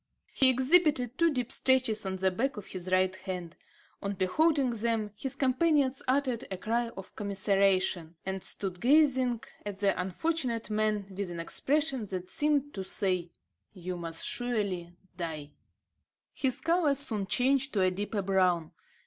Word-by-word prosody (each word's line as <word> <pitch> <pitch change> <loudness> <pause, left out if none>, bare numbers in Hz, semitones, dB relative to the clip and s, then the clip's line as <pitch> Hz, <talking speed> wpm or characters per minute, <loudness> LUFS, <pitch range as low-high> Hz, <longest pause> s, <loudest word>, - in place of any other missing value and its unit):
He 265 - +6
exhibited 260 -1 +3
two 335 -1 +4
deep 250 -3 -2
scratches 250 -6 +1
on 190 - -2
the 190 0 +1
back 250 +7 -1
of 205 - -7
his 185 0 -5
right 185 0 +3
hand. 180 -3 -6 0.5
On 200 0 -2
beholding 265 - +2
them, 225 -2 -1
his 270 +5 -3
companions 275 0 +2
uttered 255 -3 +1
a 190 - -4
cry 235 +4 -1
of 190 - -10
commiseration, 195 -4 +1
and 190 0 -3
stood 185 -3 -5
gazing 260 -3 +3 0.2
at 205 -2 -5
the 195 -3 +1
unfortunate 230 - -2
man 215 -1 +1
with 200 -1 -3
an 170 -1 -6
expression 270 - 0
that 185 -1 -6
seemed 290 -1 0
to 190 - -4
say: 185 -3 -1 0.4
"You 180 0 -5
must 165 -1 -5
surely 200 -8 -2 0.2
die." 155 -4 -5 0.8
His 260 -3 -1
colour 330 -4 +2
soon 225 -8 -1
changed 270 +3 +2
to 200 - +1
a 185 0 +3
deeper 205 +2 -3
brown. 185 -4 +2
210 Hz, 150 wpm, -30 LUFS, 185-260 Hz, 0.8 s, He